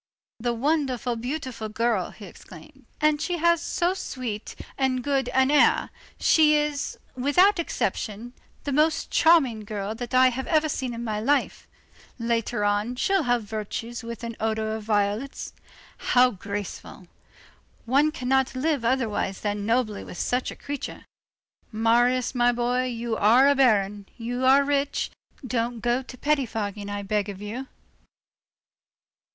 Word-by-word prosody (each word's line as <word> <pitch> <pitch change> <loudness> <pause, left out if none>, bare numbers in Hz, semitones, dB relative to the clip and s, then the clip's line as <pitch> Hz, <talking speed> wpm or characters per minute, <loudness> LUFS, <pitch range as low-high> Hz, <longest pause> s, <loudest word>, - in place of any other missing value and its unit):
"The 240 +1 0
wonderful, 260 -2 0
beautiful 245 -2 -4
girl!" 220 -3 0
he 210 - -12
exclaimed. 185 +8 -14
"And 305 -1 +2
she 350 +2 -1
has 340 0 +3
so 350 +1 0
sweet 250 - -5 0.2
and 260 -2 0
good 275 -1 0
an 265 +1 +3
air! 295 - +4 0.3
she 305 -1 +5
is, 295 -1 -1 0.2
without 350 +10 +4
exception, 235 -7 -3 0.3
the 285 - -3
most 305 +3 +1
charming 300 -9 +4
girl 205 0 -4
that 245 +2 -5
I 255 0 +6
have 260 +2 -5
ever 315 -1 +3
seen 260 -5 -3
in 235 - -5
my 215 -2 -2
life. 275 +6 0 0.5
Later 230 -2 -1
on, 205 +4 0
she'll 385 +9 +2
have 240 -2 +2
virtues 220 +3 -5
with 235 0 -7
an 230 -1 -5
odor 220 0 -1
of 220 - -5
violets. 210 +5 -1 0.5
How 250 0 +4
graceful! 200 -2 -7 0.8
one 280 +6 +3
cannot 265 -1 0
live 285 -1 0
otherwise 230 -6 -1
than 205 0 -2
nobly 225 -3 0
with - - -9
such 250 +1 -1
a - - -7
creature. 285 -1 -6 0.7
Marius, 240 +3 +2
my 245 -1 +3
boy, 245 +1 0
you 235 -2 -3
are 240 +6 +5
a 285 - +6
Baron, 205 -7 +2
you 245 +2 -3
are 270 +2 +6
rich, 285 0 -1 0.3
don't 235 -1 -2
go 240 +3 +1
to 255 -1 -11
pettifogging, 225 -8 -1
I 205 0 -4
beg 205 0 -1
of 195 -2 -7
you." 225 +6 -6
245 Hz, 145 wpm, -25 LUFS, 220-270 Hz, 0.8 s, I